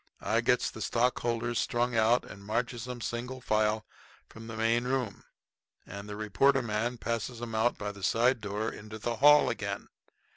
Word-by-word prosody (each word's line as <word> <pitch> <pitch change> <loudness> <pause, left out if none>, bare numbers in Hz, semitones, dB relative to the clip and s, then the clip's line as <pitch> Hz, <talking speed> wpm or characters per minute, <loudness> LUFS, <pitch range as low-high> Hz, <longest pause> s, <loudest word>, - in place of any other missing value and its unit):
I - - +1
gets - - +2
the - - -9
stockholders 120 -1 0
strung 120 0 0
out 115 +2 +3
and 100 - -11
marches 120 +3 -2
'em, 125 -1 -6
single 125 +3 -4
file, 110 -2 +1 0.5
through - - -12
from 115 - -9
the 110 -1 -6
main 115 +2 +2
room; 125 -5 -2 0.6
and 100 +2 -8
the 105 - -5
reporter 115 +6 +2
man 115 +2 -1
passes 115 +1 -3
'em 120 -1 -6
out 110 +2 +1
of 105 0 -3
the 100 - -12
side 120 +5 +2
door 105 +2 -2
into 110 +1 -9
the 115 +1 -3
hall 150 +3 +7
again. - - -3
115 Hz, 180 wpm, -30 LUFS, 110-120 Hz, 0.6 s, hall